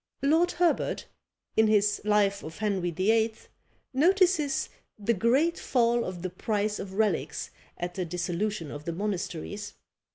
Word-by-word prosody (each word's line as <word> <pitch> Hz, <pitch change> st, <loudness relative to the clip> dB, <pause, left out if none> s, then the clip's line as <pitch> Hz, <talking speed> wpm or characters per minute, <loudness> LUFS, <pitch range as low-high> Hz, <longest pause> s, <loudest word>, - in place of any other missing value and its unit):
Lord 320 Hz, +5 st, +3 dB
Herbert, 345 Hz, -1 st, +1 dB, 0.5 s
in 220 Hz, 0 st, +5 dB
his 210 Hz, -1 st, +3 dB
Life 205 Hz, -1 st, +2 dB
of 160 Hz, +1 st, -8 dB
Henry 195 Hz, -4 st, 0 dB
VIII., 220 Hz, +6 st, +2 dB, 0.6 s
notices 345 Hz, -1 st, +3 dB, 0.3 s
the 220 Hz, +2 st, +1 dB
great 260 Hz, -, +2 dB
fall 235 Hz, -1 st, +2 dB
of 180 Hz, -1 st, -6 dB
the 185 Hz, -, -3 dB
price 210 Hz, +2 st, -1 dB
of 190 Hz, -1 st, -6 dB
relics 195 Hz, -9 st, 0 dB, 0.3 s
at 175 Hz, 0 st, -4 dB
the 185 Hz, -, -2 dB
dissolution 175 Hz, 0 st, -2 dB
of 145 Hz, +1 st, -8 dB
the 170 Hz, -, -2 dB
monasteries. 200 Hz, +1 st, -4 dB
210 Hz, 135 wpm, -28 LUFS, 180-235 Hz, 0.6 s, in